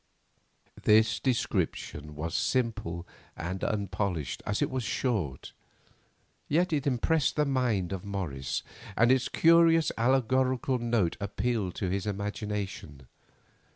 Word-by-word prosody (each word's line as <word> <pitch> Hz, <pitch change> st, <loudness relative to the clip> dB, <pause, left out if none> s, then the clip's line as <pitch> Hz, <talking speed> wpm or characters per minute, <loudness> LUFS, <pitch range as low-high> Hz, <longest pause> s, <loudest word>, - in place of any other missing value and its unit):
This 110 Hz, +1 st, +4 dB
description 75 Hz, -, -2 dB
was 80 Hz, +3 st, -4 dB
simple 110 Hz, -9 st, -1 dB, 0.3 s
and 95 Hz, +3 st, -4 dB
unpolished 95 Hz, -8 st, -2 dB
as 105 Hz, -, 0 dB
it -, -, -2 dB
was 130 Hz, -1 st, -2 dB
short. 100 Hz, -, -2 dB, 0.9 s
Yet 170 Hz, +3 st, +2 dB
it 145 Hz, -1 st, 0 dB
impressed 140 Hz, +4 st, +1 dB
the 150 Hz, -, +2 dB
mind 120 Hz, -9 st, 0 dB
of 95 Hz, -, -5 dB
Morris, 90 Hz, -10 st, -3 dB, 0.3 s
and 120 Hz, +2 st, +5 dB
its 130 Hz, 0 st, +2 dB
curious 165 Hz, -1 st, +5 dB
allegorical 130 Hz, +1 st, +2 dB
note 115 Hz, -7 st, 0 dB
appealed 100 Hz, -1 st, -1 dB
to 95 Hz, -, -2 dB
his 100 Hz, +2 st, -2 dB
imagination. 100 Hz, -, -4 dB
110 Hz, 115 wpm, -29 LUFS, 95-130 Hz, 0.9 s, and